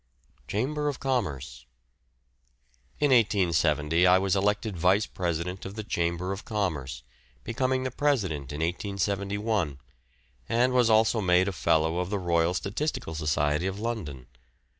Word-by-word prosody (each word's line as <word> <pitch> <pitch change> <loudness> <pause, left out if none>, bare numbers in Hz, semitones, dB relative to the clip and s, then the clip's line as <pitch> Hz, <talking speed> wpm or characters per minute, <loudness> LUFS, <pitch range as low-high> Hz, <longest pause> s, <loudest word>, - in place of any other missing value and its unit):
CHAMBER 150 +8 -1
OF 145 -3 -2
COMMERCE. 75 - -3 1.3
In 145 -2 +2
1870 85 - +3
I 90 +1 +6
was 95 0 +1
elected 105 +1 0
Vice 90 +5 +3
President 90 +1 -3
of 95 +1 -7
the 110 - -5
Chamber 85 -1 -1
of 100 0 -5
Commerce, 75 - -3 0.4
becoming 130 +2 -1
the 130 - -2
President 100 - -1
in 75 +2 -5
1871, 100 -1 -1 0.7
and 125 +2 +2
was 125 -2 +4
also 110 0 +4
made 90 0 +3
a - - 0
Fellow 80 -1 +1
of 90 0 -2
the 105 - -1
Royal 85 -1 +1
Statistical 100 - -3
Society 75 +1 0
of 95 +1 -4
London. 95 - -4
95 Hz, 135 wpm, -27 LUFS, 80-110 Hz, 1.3 s, I